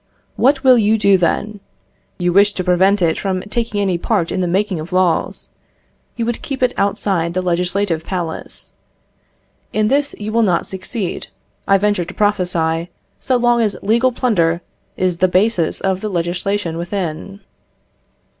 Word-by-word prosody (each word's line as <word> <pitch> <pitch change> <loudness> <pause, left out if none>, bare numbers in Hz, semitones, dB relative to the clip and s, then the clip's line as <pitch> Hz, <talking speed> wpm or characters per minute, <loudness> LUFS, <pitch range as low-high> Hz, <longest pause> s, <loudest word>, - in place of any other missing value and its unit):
What 270 +2 +2
will 255 -2 +6
you 215 +1 +3
do 200 -2 +4
then? 200 +4 0 0.6
You 175 -1 0
wish 200 +2 +5
to 185 - -3
prevent 190 +2 +3
it 160 -1 +1
from 190 -2 -2
taking 230 -3 -1
any 190 -4 0
part 185 -4 0
in 185 - -1
the 180 - 0
making 190 0 0
of 160 +4 -7
laws. 180 - 0 0.7
You 230 - -2
would 235 0 -3
keep 270 -2 -4
it 250 - +2
outside 195 -4 0
the 185 - +1
Legislative 180 -1 0
Palace. 175 -3 -5 1.0
In 215 0 +1
this 285 +2 0
you 210 +1 -5
will 230 +1 +2
not 185 -6 +1
succeed, 190 +1 -5 0.4
I 195 - +5
venture 205 -3 0
to 185 - -10
prophesy, 175 -5 0 0.3
so 255 - +1
long 240 0 +2
as 210 -3 0
legal 235 +5 +3
plunder 175 -9 +1 0.4
is 185 -2 0
the 185 - +3
basis 185 -1 +1
of 190 -1 -1
the 215 - -3
legislation 175 0 -2
within. 180 +2 -4
195 Hz, 160 wpm, -18 LUFS, 175-215 Hz, 1.0 s, will